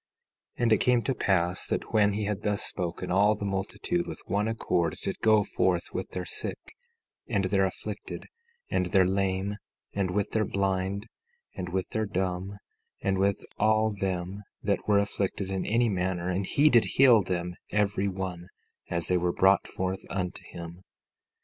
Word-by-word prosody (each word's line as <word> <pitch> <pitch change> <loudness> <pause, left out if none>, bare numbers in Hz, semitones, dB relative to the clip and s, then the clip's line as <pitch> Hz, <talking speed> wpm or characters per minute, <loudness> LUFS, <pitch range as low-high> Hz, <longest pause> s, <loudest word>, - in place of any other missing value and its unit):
17:9 - - -1
And 115 -2 +5
it - - +5
came 125 -1 +3
to 135 - 0
pass 90 -5 +1
that - - -3
when 105 -2 +4
he 105 +1 -1
had 105 -2 -2
thus 105 0 0
spoken, 90 -1 -3
all 100 +3 +4
the 105 - -5
multitude, 100 - -1
with - - -6
one 105 +3 0
accord, 90 -7 0
did - - -3
go 110 -1 +5
forth 90 -3 0
with - - -3
their 90 -1 -4
sick - - -4 0.7
and - - +1
their - - +3
afflicted, - - -5 0.5
and 90 - +1
their 95 +1 +4
lame, 95 +1 0 0.4
and 100 -2 0
with 100 +2 -1
their 110 - +2
blind, 95 0 -1 0.5
and 90 - -4
with 95 0 -2
their 110 -1 -1
dumb, 95 0 -2 0.5
and 95 -1 +1
with 100 0 +1
all 110 +1 +3
them 95 -1 -3 0.2
that 100 -1 0
were 105 -1 +5
afflicted 100 -1 -1
in 95 -1 -2
any 115 +2 +3
manner; 90 -3 -1
and 95 +1 -1
he 145 +2 +4
did 120 -6 +6
heal 125 -5 +7
them 90 -2 -2 0.2
every 105 -1 +1
one 90 -2 -4 0.4
as 85 -1 -2
they 90 - +3
were 90 0 +1
brought 95 +2 +4
forth 95 0 -3
unto 90 -2 -3
him. 85 +1 -9
95 Hz, 175 wpm, -28 LUFS, 90-105 Hz, 0.7 s, heal